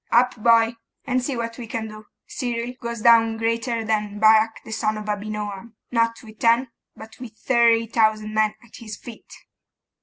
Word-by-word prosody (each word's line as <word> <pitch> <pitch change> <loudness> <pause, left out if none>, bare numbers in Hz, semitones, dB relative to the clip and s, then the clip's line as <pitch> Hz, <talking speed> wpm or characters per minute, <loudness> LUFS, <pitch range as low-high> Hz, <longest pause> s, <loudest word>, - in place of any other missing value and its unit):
'Up, 250 +2 +4
boy! 230 0 +3 0.3
and 255 -2 0
see 260 -1 -3
what 230 0 -5
we 235 - -7
can 225 0 -4
do. 215 0 -12 0.2
Cyril 240 -1 -4
goes 235 -2 -5
down 225 -1 +5
greater 230 0 -1
than 210 -1 -1
Barak 220 +1 +4
the - - -9
son 215 0 -1
of 215 - -7
Abinoam, 210 +1 -5 0.2
not 230 -1 0
with 215 -1 -14
ten, 235 +2 +3 0.3
but 220 +3 -13
with 235 -4 -10
thirty 230 0 +3
thousand 215 -1 +1
men 215 -1 +1
at 230 - -15
his 215 -3 -8
feet! 235 -2 -12
225 Hz, 175 wpm, -23 LUFS, 215-235 Hz, 0.3 s, down